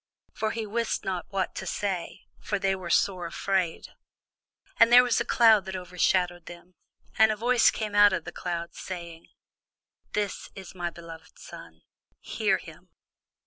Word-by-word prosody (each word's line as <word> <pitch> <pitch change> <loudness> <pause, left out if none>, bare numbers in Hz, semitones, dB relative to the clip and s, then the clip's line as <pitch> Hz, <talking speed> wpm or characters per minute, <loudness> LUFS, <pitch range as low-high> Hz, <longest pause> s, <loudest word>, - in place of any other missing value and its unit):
For 220 - -2
he 225 0 -4
wist 230 +2 -2
not 185 -3 -3
what 195 -2 -2
to - - -6
say; 185 -2 -4 0.2
for 205 - -2
they 195 0 0
were 185 -2 -7
sore 180 -2 +1
afraid. 185 -1 -2 0.9
And 230 +1 +6
there 250 +1 +9
was 245 -2 +1
a - - -2
cloud 220 -5 +5
that 190 0 -6
overshadowed 180 -1 -1
them: 175 +1 -12 0.5
and 220 0 +6
a - - -1
voice 240 +2 +3
came 215 -2 -4
out 205 0 +6
of 180 -3 -2
the 175 - -6
cloud, 170 -1 -5
saying, 170 -3 -8 0.9
This 205 -2 -3
is 190 -2 -10
my 175 -2 -3
beloved 165 -1 -13
Son: 80 0 -13 0.4
hear - - 0
him. - - -14
190 Hz, 160 wpm, -27 LUFS, 175-210 Hz, 0.9 s, there